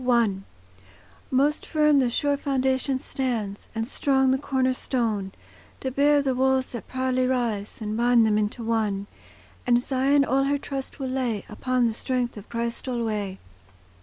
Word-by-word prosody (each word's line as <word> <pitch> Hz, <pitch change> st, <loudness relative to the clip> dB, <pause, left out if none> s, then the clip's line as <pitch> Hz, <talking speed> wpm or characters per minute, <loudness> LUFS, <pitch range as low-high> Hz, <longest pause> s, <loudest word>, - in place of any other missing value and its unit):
I 235 Hz, -5 st, +3 dB, 0.9 s
Most 280 Hz, +3 st, +2 dB
firm 300 Hz, -2 st, +3 dB
the 255 Hz, -2 st, +2 dB
sure 285 Hz, +4 st, +1 dB
foundation 265 Hz, -1 st, 0 dB
stands, 235 Hz, -7 st, -3 dB
And 225 Hz, 0 st, -2 dB
strong 265 Hz, -1 st, +2 dB
the 265 Hz, -, +2 dB
corner 260 Hz, -2 st, +1 dB
stone, 220 Hz, -7 st, -1 dB, 0.5 s
To 260 Hz, -, -2 dB
bear 285 Hz, +2 st, +3 dB
the 265 Hz, -2 st, +1 dB
walls 265 Hz, 0 st, +2 dB
that 240 Hz, -, -7 dB
proudly 255 Hz, 0 st, 0 dB
rise, 230 Hz, -5 st, -1 dB
And 210 Hz, 0 st, -3 dB
bind 240 Hz, 0 st, +4 dB
them 215 Hz, -1 st, +2 dB
into 215 Hz, +3 st, -2 dB
one; 215 Hz, -3 st, 0 dB, 0.6 s
And 240 Hz, -1 st, +5 dB
Zion 275 Hz, +2 st, +2 dB
all 270 Hz, +1 st, +2 dB
her 285 Hz, +1 st, +1 dB
trust 275 Hz, -1 st, -6 dB
will 265 Hz, -2 st, -3 dB
lay 250 Hz, -6 st, -1 dB
Upon 255 Hz, -1 st, 0 dB
the 230 Hz, -, +1 dB
strength 250 Hz, +1 st, -2 dB
of 210 Hz, 0 st, -11 dB
Christ 235 Hz, +2 st, -3 dB
alway. 215 Hz, -6 st, -2 dB
255 Hz, 160 wpm, -25 LUFS, 230-265 Hz, 0.9 s, And